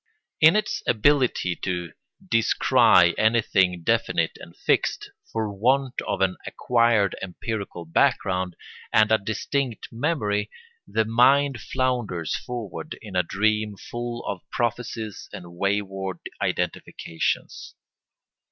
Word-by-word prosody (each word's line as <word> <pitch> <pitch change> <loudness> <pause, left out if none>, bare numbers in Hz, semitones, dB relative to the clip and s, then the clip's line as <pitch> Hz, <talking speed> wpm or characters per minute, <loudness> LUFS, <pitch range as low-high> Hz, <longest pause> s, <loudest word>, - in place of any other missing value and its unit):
In 160 +3 +7
its 215 0 0
inability 125 -6 +2
to 90 -3 -3 0.4
descry 115 - +4
anything 95 -6 +2
definite - - +1
and 85 - -13
fixed, - - 0 0.2
for 110 -2 -2
want 130 +6 +1
of 95 - -2
an 95 -1 +1
acquired 115 -5 +2
empirical 95 -1 -5
background 90 +2 +1 0.4
and 110 0 +4
a 110 - +5
distinct 115 +4 -3
memory, 105 -5 -1 0.4
the 110 - 0
mind 130 +3 +3
flounders 120 -12 -1
forward 120 - -6
in 105 -4 -9
a 90 - +4
dream 105 +3 0
full 120 +2 -6
of 100 -3 -4
prophecies 115 -3 -3
and 85 0 -9
wayward 95 0 -2 0.2
identifications. 85 -1 -3
110 Hz, 105 wpm, -24 LUFS, 95-120 Hz, 0.4 s, In